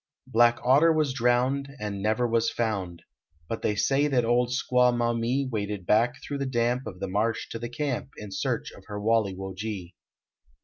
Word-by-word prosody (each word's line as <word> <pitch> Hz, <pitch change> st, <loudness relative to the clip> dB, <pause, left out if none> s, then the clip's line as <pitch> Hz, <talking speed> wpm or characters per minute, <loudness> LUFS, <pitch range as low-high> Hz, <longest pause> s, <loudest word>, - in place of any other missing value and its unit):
Black 120 Hz, +1 st, +4 dB
Otter 140 Hz, +7 st, +5 dB
was 155 Hz, -4 st, +1 dB
drowned 130 Hz, +2 st, +1 dB
And 105 Hz, -2 st, -4 dB
never 110 Hz, +4 st, +1 dB
was 115 Hz, 0 st, +2 dB
found; 95 Hz, -7 st, -3 dB, 0.4 s
But 115 Hz, -, -4 dB
they 105 Hz, -, 0 dB
say 140 Hz, +7 st, +2 dB
that 125 Hz, -5 st, +2 dB
old 120 Hz, +1 st, +2 dB
Squaw 125 Hz, 0 st, +3 dB
Maumee 120 Hz, +3 st, 0 dB
Waded 105 Hz, -5 st, -3 dB
back 115 Hz, +5 st, +3 dB
thro 140 Hz, -1 st, -4 dB
the 140 Hz, -, -1 dB
damp 120 Hz, +1 st, 0 dB
Of 90 Hz, -3 st, -8 dB
the 100 Hz, -, -3 dB
marsh 105 Hz, +4 st, -1 dB
to 115 Hz, -, -5 dB
the 120 Hz, 0 st, -5 dB
camp 135 Hz, +1 st, -3 dB
In 105 Hz, -2 st, -8 dB
search -, -, -2 dB
of -, -, -15 dB
her 105 Hz, -1 st, -5 dB
Walle 110 Hz, -1 st, +2 dB
wo 95 Hz, 0 st, -6 dB
ge. 95 Hz, -3 st, -5 dB
120 Hz, 185 wpm, -27 LUFS, 105-125 Hz, 0.4 s, Otter